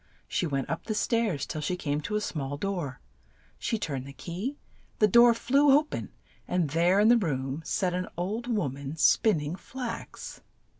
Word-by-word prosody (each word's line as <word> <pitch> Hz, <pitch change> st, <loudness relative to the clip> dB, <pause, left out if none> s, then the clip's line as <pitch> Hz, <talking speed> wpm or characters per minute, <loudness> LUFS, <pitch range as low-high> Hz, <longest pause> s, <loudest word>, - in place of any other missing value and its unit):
She 175 Hz, -, -1 dB
went 135 Hz, -3 st, -2 dB
up 165 Hz, -, -4 dB
the 215 Hz, -, -2 dB
stairs 215 Hz, -, 0 dB
till 155 Hz, -, -5 dB
she 180 Hz, +4 st, -1 dB
came 150 Hz, -4 st, -2 dB
to 210 Hz, +7 st, -3 dB
a 210 Hz, -, +1 dB
small 145 Hz, -7 st, -3 dB
door. 170 Hz, -7 st, -3 dB, 0.6 s
She 225 Hz, -, -1 dB
turned 140 Hz, -9 st, -4 dB
the 140 Hz, -, -9 dB
key, 185 Hz, -, -5 dB, 0.4 s
the 215 Hz, -, +5 dB
door 235 Hz, +3 st, +7 dB
flew 275 Hz, +5 st, +3 dB
o 300 Hz, -, +3 dB
pen, 300 Hz, -, -6 dB, 0.4 s
and 175 Hz, -5 st, 0 dB
there 175 Hz, +5 st, +3 dB
in 210 Hz, -, +5 dB
the 240 Hz, +1 st, +7 dB
room 135 Hz, -5 st, -2 dB
sat 180 Hz, +1 st, 0 dB
an 180 Hz, 0 st, -2 dB
old 210 Hz, +7 st, -2 dB
wom 180 Hz, -, -1 dB
an 140 Hz, +2 st, -6 dB
spin 210 Hz, +5 st, +4 dB
ning 150 Hz, +3 st, -3 dB
flax. 250 Hz, -, -7 dB
180 Hz, 190 wpm, -28 LUFS, 145-225 Hz, 0.6 s, door